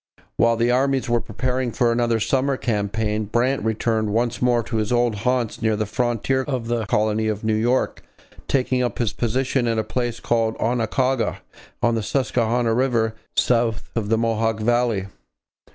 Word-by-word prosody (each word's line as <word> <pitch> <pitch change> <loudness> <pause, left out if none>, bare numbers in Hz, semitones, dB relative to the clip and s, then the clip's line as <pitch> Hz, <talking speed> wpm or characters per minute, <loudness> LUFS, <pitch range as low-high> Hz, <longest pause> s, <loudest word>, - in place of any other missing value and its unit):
While 115 0 +3
the 120 +1 +2
armies 135 +1 +1
were 120 -1 +1
preparing 125 +3 -2
for 120 0 +2
another 115 -1 +1
summer 135 +4 +1
campaign, 105 -1 -1
Brant 120 +6 +1
returned 110 0 0
once 120 +2 0
more 120 -1 +3
to 115 +1 -3
his 110 0 -1
old 120 -1 +2
haunts 125 +2 -1
near 110 -1 +2
the 110 0 -1
frontier 120 +4 0
of 130 -5 -2
the 115 -3 -1
colony 110 +1 +1
of 110 0 -2
New 110 0 +1
York, 120 +4 0 0.5
taking 130 -1 +1
up 125 - -1
his 115 -4 0
position 125 +1 0
at 115 -1 0
a 110 - +1
place 120 +2 -3
called 115 -1 0
Oquaga 125 +2 0 0.4
on 120 - +3
the 115 - 0
Susquehanna 120 -1 0
river, 115 -3 +1 0.2
south 115 -3 +1
of 110 -3 -2
the 115 - +3
Mohawk 115 -1 0
valley. 120 -3 +1
115 Hz, 170 wpm, -22 LUFS, 110-125 Hz, 0.5 s, While